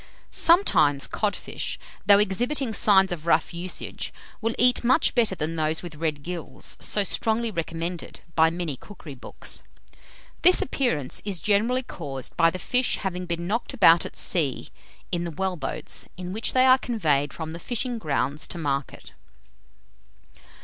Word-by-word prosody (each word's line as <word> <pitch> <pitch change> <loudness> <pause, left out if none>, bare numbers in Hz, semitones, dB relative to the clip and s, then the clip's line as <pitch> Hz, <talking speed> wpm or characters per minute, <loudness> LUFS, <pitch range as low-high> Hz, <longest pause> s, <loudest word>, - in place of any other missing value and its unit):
Sometimes, 165 - +3
codfish, 210 -2 -3 0.3
though 200 -1 +9
exhibiting 235 +6 +1
signs 195 -2 +5
of 170 -2 -5
rough 170 - +2
usage, 175 +1 -5 0.3
will 230 +1 -1
eat 250 0 +3
much 260 +6 +3
better 225 -6 +2
than 160 0 -3
those 155 +1 0
with 175 -2 -7
red 150 -2 -3
gills, 165 -6 -6
so 205 - +1
strongly 225 +3 0
recommended 165 0 -4
by 160 0 +5
many 165 -3 -3
cookery 165 -1 -11
books. 130 - -3 0.8
This 365 - +7
appearance 160 - -1
is 200 -4 -3
generally 220 +8 +2
caused 135 - -6
by 165 - +5
the 185 - -5
fish 250 +7 +1
having 180 -2 -4
been 170 0 -3
knocked 230 +7 -2
about 170 -7 +6
at - - -8
sea, 150 -8 -1 0.4
in 175 -1 0
the 170 - -3
well 190 +3 -2
boats, 145 -6 -6
in 180 0 -5
which 220 +3 -1
they 255 0 +5
are 260 0 +6
conveyed 150 - 0
from 160 -1 -6
the 165 - -7
fishing 240 +4 -3
grounds 145 - -1
to - - -6
market. 140 -4 -3
180 Hz, 155 wpm, -25 LUFS, 160-220 Hz, 0.8 s, though